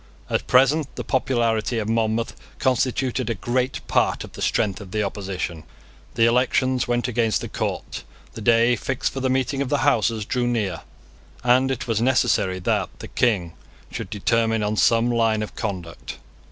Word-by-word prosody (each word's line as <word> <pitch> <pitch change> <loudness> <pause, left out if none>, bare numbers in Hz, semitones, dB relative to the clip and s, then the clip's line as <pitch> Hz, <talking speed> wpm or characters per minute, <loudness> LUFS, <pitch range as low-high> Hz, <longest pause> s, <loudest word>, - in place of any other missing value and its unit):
At - - -1
present 135 +4 +3
the - - -4
popularity 120 -3 0
of 110 -2 -2
Monmouth 115 0 0 0.2
constituted 130 -1 0
a 115 - 0
great 125 +5 -2
part - - +1
of - - -10
the - - -10
strength 100 -1 0
of 100 - -10
the 105 +2 -1
opposition. 95 -5 -4 0.5
The 115 - +4
elections 125 +1 +2
went 120 0 0
against 115 -2 +1
the - - -4
court: - - -4 0.3
the 115 - -8
day 115 +2 +4
fixed 135 +2 -2
for 135 - -3
the 130 0 0
meeting 135 +1 0
of 140 - -2
the 145 -2 +1
Houses 115 -5 +2
drew 125 +2 -1
near; 105 -8 -1 0.6
and 125 +2 +4
it 130 -2 -3
was 115 -1 0
necessary 120 -7 +2
that 90 - 0
the - - -9
King 95 -9 +1 0.4
should - - -5
determine 110 +1 +1
on 105 +1 0
some 115 +5 +3
line 115 -2 +2
of 105 - -7
conduct. 85 - -5
115 Hz, 170 wpm, -23 LUFS, 105-125 Hz, 0.6 s, The